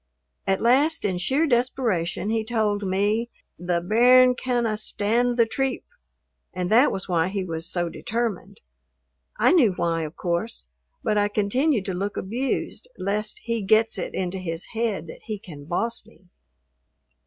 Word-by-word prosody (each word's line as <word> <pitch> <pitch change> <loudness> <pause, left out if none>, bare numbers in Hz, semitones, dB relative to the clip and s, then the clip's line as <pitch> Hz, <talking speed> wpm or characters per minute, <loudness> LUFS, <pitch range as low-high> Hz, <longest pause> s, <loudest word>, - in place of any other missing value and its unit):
At 195 - +1
last, 285 +7 +3
in 185 -3 0
sheer 270 - +1
desperation 235 - 0
he 225 -1 0
told 215 -2 0
me 205 +4 0 0.3
the 175 0 0
"bairn 250 +6 +6
canna 240 -3 -1
stand 235 +3 0
the 230 - +5
treep," 265 +3 -2 0.7
and 180 +1 -2
that 245 +6 +6
was 195 - -4
why 170 -2 +1
he 195 0 -2
was 165 -1 -5
so 175 -1 -1
determined. 210 +1 -4 0.8
I - - +4
knew 265 - +5
why, 165 -2 -1
of 155 0 -5
course, 175 +6 -3 0.4
but 215 -4 +2
I 205 - +3
continued 215 +3 +1
to 190 - -2
look 200 +3 -3
abused 250 - -3
lest 210 +2 -2
he 230 -1 -2
gets 220 +3 +3
it - - -4
into 185 0 -2
his 165 -2 -4
head 220 -7 -1
that 160 - -11
he 215 -2 -4
can 155 -7 -11
boss 230 +9 -1
me. 210 -3 -22
210 Hz, 155 wpm, -24 LUFS, 185-235 Hz, 0.8 s, bairn